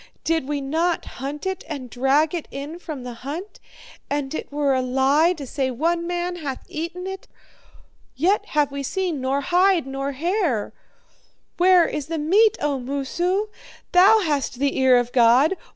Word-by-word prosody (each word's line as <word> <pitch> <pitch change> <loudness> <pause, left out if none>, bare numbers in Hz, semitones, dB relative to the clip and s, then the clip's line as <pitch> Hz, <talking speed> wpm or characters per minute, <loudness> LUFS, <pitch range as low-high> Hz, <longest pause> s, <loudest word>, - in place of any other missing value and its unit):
Did 320 -4 0
we 290 -1 -2
not 325 +5 0 0.2
hunt 285 +4 -5
it 380 -1 -3
and 275 -4 -6
drag 270 +6 +1
it 340 -3 -4
in 290 +5 -7
from 305 -7 -7
the 250 -1 -6
hunt? 320 +10 -6 0.5
And 285 -1 -2
it - - -5
were 285 -1 +1
a 260 - +1
lie 270 +6 +3
to 300 -5 -8
say 265 +1 -2
one 335 +7 -1
man 350 0 -2
hath 280 -6 -6
eaten 340 +3 -5
it; 385 0 -7 0.9
yet 360 +10 +1
have 295 -2 +1
we 280 0 -4
seen 340 0 -2
nor 270 +2 0
hide 360 +1 +3
nor 275 +1 -4
hair. 325 - -1 0.8
Where 360 -1 +5
is 300 -2 -4
the 325 0 -3
meat, 410 +9 +3
O 285 -2 -1
Moosu? 345 +10 -1 0.4
Thou 400 +5 +6
hast 290 -7 -1
the 275 +1 0
ear 260 -1 +5
of 245 0 0
God. 250 +8 +4
295 Hz, 170 wpm, -23 LUFS, 270-350 Hz, 0.9 s, Thou